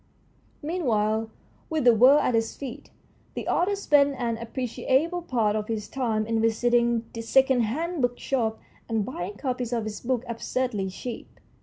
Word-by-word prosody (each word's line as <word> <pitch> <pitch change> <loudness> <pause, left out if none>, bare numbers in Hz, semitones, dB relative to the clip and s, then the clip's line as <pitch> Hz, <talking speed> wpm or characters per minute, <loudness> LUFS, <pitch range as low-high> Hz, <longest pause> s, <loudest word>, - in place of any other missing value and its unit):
Meanwhile, 225 -9 0 0.4
with 315 -3 0
the 240 -1 +7
world 255 +6 +6
at - - +1
his 225 0 0
feet, 275 +1 -8 0.5
the - - -4
author 385 +4 +2
spent 285 -7 +3
an 235 -2 -2
appreciable 260 +8 -1
part 230 -10 0
of 215 -1 -2
his 215 -2 -3
time 225 -5 -1
in 225 0 0
visiting 235 +1 +2
the 230 - -5
second 265 +2 +3
hand 315 +9 -2
bookshops 245 -2 0 0.3
and 220 -3 0
buying 200 -5 -5
copies 250 -3 -3
of 235 -2 0
his 215 -1 -6
book 250 -1 -1
absurdly 235 -3 -2
cheap. 230 +5 -8
240 Hz, 155 wpm, -26 LUFS, 225-265 Hz, 0.5 s, the